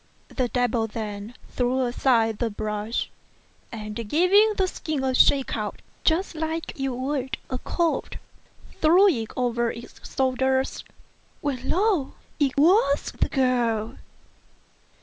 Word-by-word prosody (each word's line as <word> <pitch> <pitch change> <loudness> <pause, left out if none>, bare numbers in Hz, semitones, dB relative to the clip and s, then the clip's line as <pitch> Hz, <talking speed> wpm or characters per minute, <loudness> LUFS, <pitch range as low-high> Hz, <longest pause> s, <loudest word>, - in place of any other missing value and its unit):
The 255 -2 -1
devil 240 -2 0
then 210 +1 -6
threw 255 +1 0
aside 235 -3 +2
the 235 - 0
brush, 210 +2 -3 0.6
and 215 -2 -6
giving 395 - +5
the 380 - +3
skin 310 -6 -3
a 260 -1 +1
shake 270 +1 +4
out, 210 -2 -5 0.2
just 340 +2 +1
as 320 +1 -2
you 270 -1 -2
would 265 0 -2
a 255 - -2
coat, 335 +3 -1 0.6
threw 350 +6 +6
it 230 - -1
over 240 -1 +1
its 235 +1 -11
shoulders, 265 0 +1 0.6
when, 265 -3 -3
lo! 370 -6 +1 0.3
it 280 -3 +1
was 300 -2 +4
the - - +2
girl. 240 -3 0
260 Hz, 125 wpm, -25 LUFS, 235-305 Hz, 0.6 s, threw